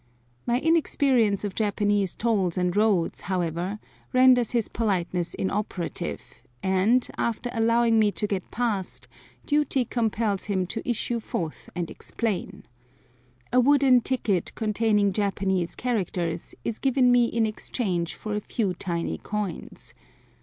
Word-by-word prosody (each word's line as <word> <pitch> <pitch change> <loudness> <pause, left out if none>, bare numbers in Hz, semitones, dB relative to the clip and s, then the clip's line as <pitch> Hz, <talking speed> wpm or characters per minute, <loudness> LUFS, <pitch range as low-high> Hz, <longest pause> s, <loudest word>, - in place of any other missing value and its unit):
My 240 +1 +2
inexperience 270 - +2
of 205 -2 -3
Japanese 205 -2 0
tolls 200 -7 0
and 180 -1 0
roads, 205 -5 +2
however, 180 +1 -2 0.4
renders 255 -2 +5
his 235 -3 0
politeness 180 -5 -1
inoperative, 195 -2 -3 0.4
and, 195 +7 +3
after 235 +1 -1
allowing 230 0 +3
me 210 -1 +4
to - - -2
get 195 -3 -3
past, 215 -6 -2 0.4
duty 290 -3 +1
compels 220 -4 -1
him 190 -3 0
to 225 +7 -5
issue 240 0 0
forth 165 -7 -5
and 175 -2 -3
explain. 220 -5 -3 0.9
A 250 - +6
wooden 265 -1 +5
ticket 220 -8 -1
containing 210 -2 +1
Japanese 190 -3 0
characters 180 -8 -2
is 225 - -2
given 260 -2 +3
me 245 -1 +5
in 230 -1 +1
exchange 195 -5 -2
for 215 - -5
a 210 - -1
few 205 -3 -1
tiny 170 -1 -3
coins. 210 -3 -5
210 Hz, 125 wpm, -26 LUFS, 190-235 Hz, 0.9 s, A